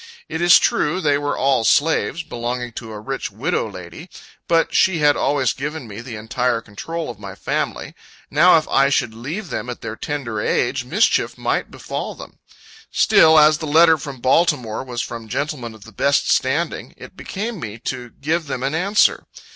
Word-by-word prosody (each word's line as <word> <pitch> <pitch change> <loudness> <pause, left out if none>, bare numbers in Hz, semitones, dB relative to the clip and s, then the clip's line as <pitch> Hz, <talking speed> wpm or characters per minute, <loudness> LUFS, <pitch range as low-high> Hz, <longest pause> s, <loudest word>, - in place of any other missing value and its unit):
It 160 +2 -4
is 175 +1 +8
true, 160 +5 +1
they 145 -5 +2
were 145 0 -2
all 135 -3 +2
slaves, 160 +5 +2
belonging 120 +1 -4
to 115 0 -8
a 105 - -7
rich 135 +5 -4
widow - - -2
lady. 95 - -10 0.4
But 165 -1 +2
she 190 -2 +3
had 145 -2 +4
always 140 -4 +1
given 150 -1 -5
me 105 +1 -8
the 120 -1 -8
entire 115 +2 -1
control 155 +8 -6
of 110 - -14
my 100 -2 -8
family. - - -3 0.4
Now, 165 +4 +6
if 155 - -1
I 135 0 +4
should 120 -4 0
leave 155 - -6
them 125 - -4
at 125 - -6
their 110 -1 -5
tender 115 -6 -4
age, - - 0
mischief - - +1
might - - -1
befall - - -5
them. - - -12 0.5
Still, 160 0 +5
as 155 0 +6
the 155 - -4
letter 160 +1 +5
from 135 -3 -8
Baltimore 130 -5 +1
was 125 -2 -4
from 115 -1 -7
gentlemen 130 -4 -3
of 110 - -15
the 110 - -13
best 140 +7 +1
standing, 145 +6 -1
it - - -12
became 215 +1 -5
me 110 -5 -6
to 125 -2 -4
give 155 +6 -2
them 130 -2 -4
an 135 +2 -1
answer. 195 +6 +2
140 Hz, 185 wpm, -20 LUFS, 115-160 Hz, 0.5 s, is